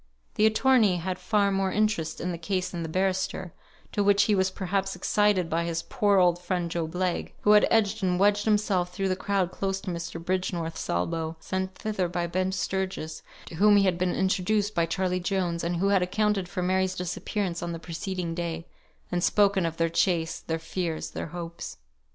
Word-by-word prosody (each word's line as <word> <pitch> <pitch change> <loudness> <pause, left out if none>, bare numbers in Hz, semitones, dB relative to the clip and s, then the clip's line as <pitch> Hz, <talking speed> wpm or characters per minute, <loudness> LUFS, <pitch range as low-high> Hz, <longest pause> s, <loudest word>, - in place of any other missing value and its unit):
The 215 - +4
attorney 220 -4 +4
had 180 +2 -3
far 205 -2 +2
more 195 -1 0
interest 210 -7 0
in 180 - -2
the 170 - -4
case 185 +1 -2
than 175 - -4
the 165 - -4
barrister, 185 0 -1 0.4
to 205 - +1
which 200 0 +5
he 210 - +2
was 190 -1 +2
perhaps 195 +1 -2
excited 205 -4 +2
by 165 +1 0
his 165 -1 -2
poor 210 -7 +2
old 175 -2 +4
friend 175 -1 -2
Job 165 0 -3
Legh; 180 -1 -1
who 210 - +4
had 210 0 +6
edged 220 -1 +2
and 180 -1 +1
wedged 205 +1 +3
himself 205 -4 +1
through 195 +1 -1
the 185 - +1
crowd 190 -1 0
close 195 0 -2
to 185 - -4
Mr. 170 -1 -5
Bridgenorth's 175 -2 -2
elbow, 160 - -1
sent 190 +2 -3
thither 210 -4 -2
by 175 0 -2
Ben 185 +2 -1
Sturgis, 190 -4 -3 0.2
to - - -9
whom 205 +2 +6
he 200 - +5
had 180 -3 +1
been 180 0 +1
"introduced" 200 +2 +1
by 170 -1 +1
Charley 180 +1 0
Jones, 180 -2 -1
and 170 +1 -1
who 195 +4 +1
had 195 -2 +4
accounted 195 0 0
for 180 -1 -3
Mary's 185 0 +1
disappearance 180 0 -3
on 175 -1 -3
the 165 - -4
preceding 170 +1 -4
day, 165 -1 -4 0.5
and 175 -1 0
spoken 200 -4 +3
of 165 0 -5
their 165 - +2
chase, 165 -1 +1
their 165 - -3
fears, 165 0 -3
their - - -5
hopes. 170 0 -7
185 Hz, 200 wpm, -27 LUFS, 170-200 Hz, 0.5 s, had